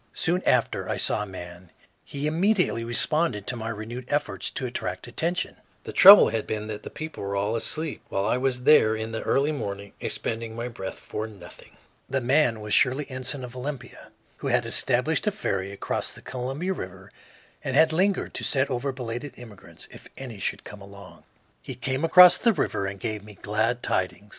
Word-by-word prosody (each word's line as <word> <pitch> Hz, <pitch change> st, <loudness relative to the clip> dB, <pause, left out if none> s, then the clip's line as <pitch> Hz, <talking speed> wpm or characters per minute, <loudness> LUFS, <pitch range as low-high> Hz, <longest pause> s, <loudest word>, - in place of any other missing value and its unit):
Soon 180 Hz, +2 st, +1 dB
after 125 Hz, -2 st, +1 dB
I -, -, -1 dB
saw -, -, +2 dB
a -, -, -3 dB
man; 90 Hz, -1 st, -10 dB, 0.3 s
he 140 Hz, +1 st, -5 dB
immediately 175 Hz, -, +1 dB
responded 120 Hz, -1 st, +1 dB
to 125 Hz, -, -1 dB
my 115 Hz, -1 st, -5 dB
renewed 115 Hz, +3 st, -6 dB
efforts 110 Hz, -11 st, -1 dB
to 130 Hz, -, -4 dB
attract 95 Hz, -7 st, -4 dB
attention. 165 Hz, +9 st, -2 dB, 0.3 s
The -, -, -7 dB
trouble 200 Hz, +2 st, +10 dB
had 110 Hz, 0 st, -3 dB
been 105 Hz, -1 st, -3 dB
that 105 Hz, -1 st, -5 dB
the -, -, -8 dB
people 155 Hz, +1 st, -7 dB
were 100 Hz, 0 st, -3 dB
all 105 Hz, +3 st, 0 dB
asleep, 155 Hz, +6 st, -2 dB
while 100 Hz, 0 st, -1 dB
I 110 Hz, -, +2 dB
was 125 Hz, -1 st, -1 dB
there 110 Hz, -7 st, +5 dB
in 110 Hz, 0 st, -4 dB
the 110 Hz, -, -4 dB
early 140 Hz, +3 st, +1 dB
morning 100 Hz, -7 st, -5 dB
expending 115 Hz, 0 st, -3 dB
my 120 Hz, +1 st, -4 dB
breath 95 Hz, -5 st, -7 dB
for 110 Hz, +1 st, -5 dB
nothing. 100 Hz, -5 st, -13 dB, 0.3 s
The 135 Hz, -, 0 dB
man 125 Hz, -3 st, +2 dB
was 105 Hz, 0 st, -3 dB
Shirley 140 Hz, +2 st, +3 dB
Ensign, 130 Hz, +1 st, -4 dB
of 125 Hz, 0 st, -9 dB
Olympia, 130 Hz, 0 st, -7 dB, 0.3 s
who -, -, -5 dB
had -, -, +2 dB
established -, -, +1 dB
a -, -, +3 dB
ferry 95 Hz, +1 st, -3 dB
across 100 Hz, -, -3 dB
the -, -, -13 dB
Columbia 135 Hz, +9 st, -3 dB
River 95 Hz, -, -9 dB, 0.5 s
and 135 Hz, -, -2 dB
had 160 Hz, +2 st, +5 dB
lingered 190 Hz, +3 st, +1 dB
to -, -, -4 dB
set 135 Hz, 0 st, +1 dB
over 130 Hz, +2 st, -1 dB
belated 125 Hz, +1 st, -6 dB
immigrants, 115 Hz, -5 st, -11 dB
if -, -, -13 dB
any 125 Hz, -6 st, -8 dB
should -, -, -3 dB
come 105 Hz, -1 st, -11 dB
along. 100 Hz, -1 st, -13 dB, 0.4 s
He -, -, -7 dB
came 130 Hz, +3 st, -2 dB
across 180 Hz, +2 st, +8 dB
the 230 Hz, -, +3 dB
river 100 Hz, -, -1 dB
and 100 Hz, 0 st, -6 dB
gave 110 Hz, -2 st, -4 dB
me 105 Hz, -1 st, -13 dB
glad 110 Hz, +4 st, -1 dB
tidings. 95 Hz, +3 st, -2 dB
120 Hz, 190 wpm, -25 LUFS, 105-140 Hz, 0.5 s, trouble